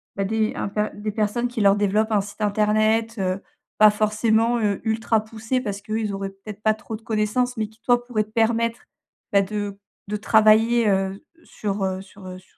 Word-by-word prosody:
bah, 195 - -1
des 220 +1 0
un - - -3
p 210 +1 -1
des 210 +1 -4
personnes 215 +3 0
qui 240 - -5
leur 200 -1 +5
développent 210 +2 +1
un 210 -2 +3
site 205 +2 -10
internet? 215 +2 +1
Heu, 185 0 -1 0.4
pas 215 0 +8
forcément, 220 +2 +1
heu, 205 -3 0
ultra 220 0 +1
poussé, 225 +3 -3
parce 205 -4 -4
qu'eux 215 +2 -2
ils 215 -2 -2
auraient, 195 0 -4
peut-être, 195 +1 -11
pas 215 - +4
trop 220 +1 -7
de - - -22
connaissances 230 +3 0
mais 215 -1 -1
qui, 220 +1 -24
toi, 245 -1 +3
pourrait 230 -4 0
te 210 - -24
permettre, 230 +1 +1 0.5
bah, 200 - +6
de 205 0 -4 0.3
de 210 - -3
travailler, 220 +2 +4
heu, 195 0 -1 0.2
s - - -23
sur, 200 -1 -3
heu 190 0 -2
sur, 195 0 -15
heu, 185 0 -7
s 185 - -16
215 Hz, 210 wpm, -23 LUFS, 200-225 Hz, 0.5 s, pas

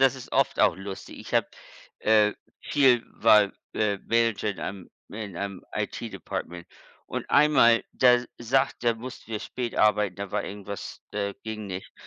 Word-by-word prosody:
das 135 -1 +5
ist 130 - -11
oft - - +2
auch - - +5
lustig. 95 0 -8
Ich - - -7
habe - - +3 0.5
äh, 105 -1 +4 0.3
viel 130 -5 +4
war, 105 -2 +5 0.2
äh, 100 -2 +1
Manager 115 -2 +1
in 100 - -3
einem 95 -2 -6 0.2
in 105 -4 -7
einem 100 0 -5
IT-Department 85 0 -5 0.4
und - - -5
einmal, 120 -6 +5
da 125 -1 +5
sagt 125 +2 +1
da 120 -1 +3
mussten 120 0 -10
wir 110 - -2
spät 120 +1 -5
arbeiten, 105 -3 +3
da 100 -1 -5
war - - -1
irgendwas 100 -1 -7
äh, 100 -1 -2
ging 110 -1 -5
nicht. 95 -1 -7
105 Hz, 160 wpm, -26 LUFS, 100-120 Hz, 0.5 s, das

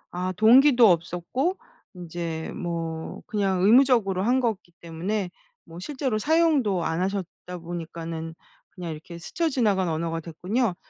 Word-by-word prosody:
아 185 +1 -1
동기도 240 -1 +7
없었고 180 - -1 0.4
인제 170 -2 -5
뭐 165 -2 -4
그냥 195 -5 0
의무적으로 225 -5 +4
한 250 +5 +2
거기 220 -7 -2
때문에 180 +3 -3 0.3
뭐 165 +1 -11
실제로 260 0 -2
사용도 290 - +2
안 165 +2 -1
하셨다 185 -2 -4
보니까는 165 -1 -6 0.3
그냥 175 -4 -7
이렇게 160 +2 -9
스쳐 325 - -2
지나간 205 - +1
언어가 165 +1 -2
됐군요. 185 +6 -1
185 Hz, 295 characters per minute, -25 LUFS, 170-235 Hz, 0.4 s, 동기도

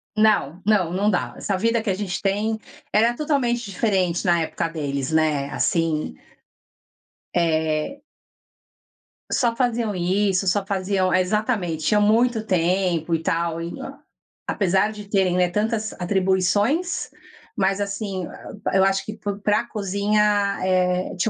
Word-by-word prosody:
Não, 205 -6 +2
não, 200 -6 +2
não 200 +4 +1
dá. 180 - -1
Essa 195 - -1
vida 230 +3 +1
que 220 - -3
a - - +2
gente 190 -2 -3
tem, 210 +3 0 0.3
era 230 +3 +3
totalmente 260 -6 0
diferente 185 -4 0
na 170 -2 +3
época 160 - -2
deles, 140 -4 -3
né, 155 -3 +1
assim. 165 -3 0 1.2
Eh. 160 - 0 1.3
Só 235 -3 +1
faziam 235 -4 0
isso, 190 +2 +1
só 195 +2 +1
faziam 190 -1 0
exatamente, 185 -3 0
ah, 210 - +4
muito 225 +1 +3
tempo 175 -2 +1
e 160 - -2
tal, 165 0 0 0.9
apesar 195 +2 +1
de 210 -1 -9
terem, 190 -3 +2
né, 180 -1 +3
tantas 215 +3 -1
atribuições, 195 - +1 0.5
mas 195 0 +1
assim, 200 -2 -3 0.5
eu 190 - +4
acho 195 0 +1
que 215 - -5
p 205 -1 -3
pra 210 +3 +2
cozinha 205 0 +1
tinha, 185 +1 +1
195 Hz, 125 wpm, -23 LUFS, 180-215 Hz, 1.3 s, ah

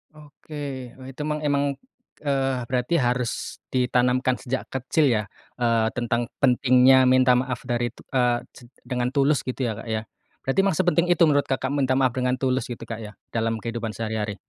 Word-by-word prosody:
Oke. 145 -4 -8
Oh 130 - -10
itu 135 +3 -8
mang 150 0 -2
memang, 145 -1 +1 0.6
eee, 135 -3 0
berarti 130 +6 +1
harus 125 -1 -2
ditanamkan 125 0 +2
sejak 130 0 -4
kecil 135 +3 +1
ya, 110 -4 +2 0.3
eee, 115 -2 +2
tentang 120 -1 -1 0.2
pentingnya 130 0 +5
minta 130 0 +5
maaf 125 -1 -3
dari 120 -1 -1
t - - -16
eee, 125 -2 +2
set 120 - -15 0.2
dengan 125 -1 -1
tulus 140 -1 +3
gitu 130 +1 -2
ya 115 - 0
Kak, - - -9
ya. 110 0 -2 0.4
Berarti 135 +7 0
emang 185 - +1
sepenting 175 0 +2
itu 175 -1 +4
menurut 145 -3 +3
Kakak, 135 0 -1
minta 135 -2 +1
maaf 130 -2 +3
dengan 125 0 0
tulus 130 -1 -1
gitu 120 -1 -7
Kak, 115 -1 -6
ya, 105 -1 -9 0.2
dalam 115 0 0
kehidupan 115 -3 -4
sehari-hari? 110 -2 -3
125 Hz, 180 wpm, -24 LUFS, 120-135 Hz, 0.6 s, pentingnya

